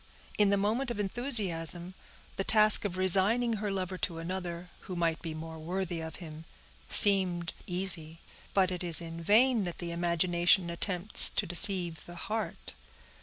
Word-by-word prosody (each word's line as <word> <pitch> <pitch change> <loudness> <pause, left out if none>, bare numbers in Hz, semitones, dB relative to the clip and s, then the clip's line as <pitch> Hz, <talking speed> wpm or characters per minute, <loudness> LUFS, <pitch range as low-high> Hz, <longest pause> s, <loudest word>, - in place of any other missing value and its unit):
In 205 -1 +3
the 200 - +1
moment 225 +6 -2
of 235 - -6
enthusiasm, 190 - +1 0.4
the 195 - -3
task 215 +1 +5
of 185 -2 -4
resigning 205 +6 +2
her 210 - -3
lover 185 -1 -5
to 170 - -4
another, 175 0 -7
who 185 - -9
might 165 -2 -2
be 160 -2 -7
more 160 0 -9
worthy 175 +1 -5
of 160 0 -8
him, 160 -2 -11 0.4
seemed 185 -4 +5
easy; 175 -3 -1 0.4
but 190 -2 +2
it 180 0 -6
is 170 -3 0
in 165 0 -9
vain 225 +5 +2
that 175 - -6
the 170 -1 -6
imagination 175 +1 0
attempts 180 +3 +2
to - - -3
deceive 175 -2 0
the 175 - -11
heart. 215 +5 -6
180 Hz, 160 wpm, -29 LUFS, 170-200 Hz, 0.4 s, task